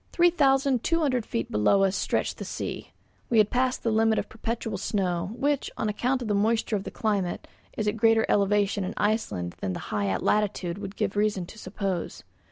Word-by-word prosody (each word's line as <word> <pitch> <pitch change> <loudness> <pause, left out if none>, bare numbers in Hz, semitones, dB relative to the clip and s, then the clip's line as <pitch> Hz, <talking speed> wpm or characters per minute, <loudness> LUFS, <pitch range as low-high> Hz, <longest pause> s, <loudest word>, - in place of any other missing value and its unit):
Three 350 0 +5
thousand 270 -5 +3
two 330 0 +1
hundred 255 -7 0
feet 115 - -3
below 150 - +3
us 195 0 +2
stretched - - -1
the - - -4
sea. - - -5 0.4
We 235 - +2
had 215 -1 +4
passed 255 +1 0
the 230 - +1
limit 220 0 +3
of 210 - -2
perpetual 225 -2 -4
snow, 185 -4 -1
which, 285 +1 0
on 215 - -1
account 250 +5 0
of - - -5
the 210 - +1
moisture 220 +2 +1
of 195 - -3
the - - -4
climate, 200 -5 -2 0.3
is 215 - -1
at 210 - +2
a - - -8
greater 225 0 +4
elevation 205 0 +2
in 185 - -4
Iceland 205 - -1
than 95 - -2
the - - -4
high 100 -2 0
latitude 200 - 0
would 200 -1 -7
give 195 - -1
reason 205 -3 +1
to 215 - -12
suppose. 190 -3 -4
210 Hz, 205 wpm, -27 LUFS, 195-230 Hz, 0.4 s, Three